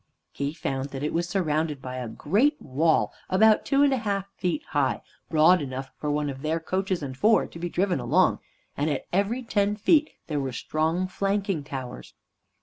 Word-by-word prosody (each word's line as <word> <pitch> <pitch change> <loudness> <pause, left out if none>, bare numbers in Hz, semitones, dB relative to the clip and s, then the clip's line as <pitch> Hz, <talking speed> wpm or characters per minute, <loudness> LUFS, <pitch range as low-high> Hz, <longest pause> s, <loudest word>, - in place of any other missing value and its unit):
He 140 0 -3
found 135 -3 -3
that 135 0 -6
it 150 - -1
was 170 +1 -1
surrounded 155 -5 0
by 130 -1 -6
a 125 -1 -4
great 215 - +1
wall 155 +4 +1 0.2
about 215 +3 +4
two 275 +1 +3
and 280 -1 +4
a - - +1
half 200 -3 -2
feet 170 -4 -2
high, 140 -3 0 0.3
broad 160 +2 +5
enough 135 -1 -5
for 150 - -4
one 145 0 0
of 135 -1 -5
their 155 +2 0
coaches 185 0 -2
and 130 -2 -5
four 215 +10 +4
to 165 - -11
be 175 +1 -3
driven 180 -2 0
along, 150 +10 +2 0.4
and 145 +2 0
at 145 - -2
every 205 +7 +1
ten 205 -2 +1
feet 305 +8 +3 0.2
there 150 -3 -2
were 135 -2 -3
strong 160 +8 -1
flanking 195 -3 -1
towers. 130 -3 -7
165 Hz, 190 wpm, -26 LUFS, 140-195 Hz, 0.4 s, broad